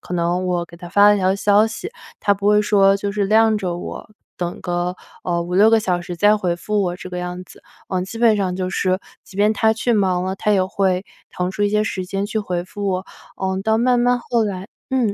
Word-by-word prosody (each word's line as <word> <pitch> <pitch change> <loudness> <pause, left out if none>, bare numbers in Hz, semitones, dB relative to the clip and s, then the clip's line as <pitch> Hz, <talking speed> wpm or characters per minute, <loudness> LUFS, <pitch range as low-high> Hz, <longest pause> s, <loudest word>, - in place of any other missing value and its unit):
可 180 - -6
能 175 +1 0
我 175 -1 0
给 170 - -14
他 175 0 -10
发 205 +3 +5
了 210 - +5
条 190 -1 +2
消 205 +2 +3
息， 225 - -6 0.3
他 205 - +3
不 200 +1 -4
会 210 0 +5
说 195 -2 +4
就 200 0 -3
是 200 0 -1
晾 220 +2 +4
着 180 -4 -3
我， 175 - -7 0.3
等 175 -1 -4
个， 175 0 -2 0.3
呃， 170 -1 0
5-6 180 +5 +4
个 225 -1 +4
小 180 -4 0
时 175 0 -6
再 205 +4 +4
回 180 -4 -1
复 210 +4 -1
我 175 -2 -1
这 185 - -9
个 180 - -4
样 180 0 -5
子。 185 - -17 0.3
嗯， 185 -1 -1
基 210 +4 -8
本 230 -2 +4
上 190 -3 -1
就 185 0 -3
是， 185 0 0 0.2
即 190 - -15
便 210 +2 +3
他 220 0 +2
去 235 +2 0
忙 190 -4 +1
了， 190 +1 -3
他 210 - +1
也 190 -2 +3
会 190 0 0 0.3
腾 180 0 -2
出 205 +2 -3
一 - - +2
些 210 0 +2
时 190 -3 -3
间 195 +1 -2
去 220 - -2
回 180 -4 -2
复 200 +2 -6
我。 185 0 -2 0.4
嗯， 190 0 -1
到 220 +1 +2
慢 245 +1 +3
慢 245 0 +2
后 235 -1 0
来 195 -1 -5 0.2
嗯， 245 -6 +1
195 Hz, 260 characters per minute, -20 LUFS, 180-210 Hz, 0.4 s, 发